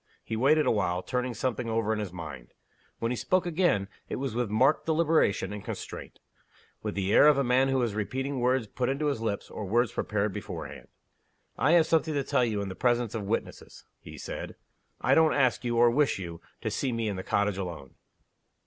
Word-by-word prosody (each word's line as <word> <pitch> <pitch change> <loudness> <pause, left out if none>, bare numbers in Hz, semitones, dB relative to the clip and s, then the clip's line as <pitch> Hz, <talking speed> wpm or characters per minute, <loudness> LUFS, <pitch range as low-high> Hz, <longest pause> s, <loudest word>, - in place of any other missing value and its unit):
He 110 - -4
waited 150 +6 +3
a - - +3
while, 90 -4 0
turning 125 -1 -2
something 125 0 -2
over 110 -1 0
in 110 - -2
his 105 -4 -4
mind. 80 -9 -9 0.4
When 115 +1 -1
he - - 0
spoke 185 +9 +1
again, 170 - +1 0.2
it - - -2
was 135 -3 -3
with 120 -2 -1
marked 130 +11 +2
deliberation 155 - +2
and 105 - -7
constraint - - -7 0.6
with - - -4
the 100 0 0
air - - +7
of 150 -2 +6
a 140 - +2
man 125 +2 +3
who 135 0 +1
was 120 -4 0
repeating 130 +6 -2
words 125 0 +2
put 125 +4 -2
into 140 +3 -1
his 140 -6 0
lips, 110 -3 -2
or - - -5
words 120 +4 +2
prepared 105 -1 -1
beforehand. - - -7 0.7
"I 145 +7 +3
have 170 -2 +6
something 160 -1 +1
to 140 - +1
tell 125 - +1
you 105 -4 0
in 100 - -5
the - - -5
presence 120 +1 +1
of 105 -4 -4
witnesses," 115 - -4
he - - -11
said. - - -6 0.5
"I - - +3
don't 160 -1 +4
ask 130 -4 +2
you, 120 -1 -1
or 120 0 +6
wish 145 +3 +2
you, 85 -3 -7 0.2
to - - -2
see 135 - -1
me 115 -1 -1
in 100 - -2
the 95 - -4
cottage 100 0 0
alone." 85 -8 -6
120 Hz, 210 wpm, -28 LUFS, 105-135 Hz, 0.7 s, air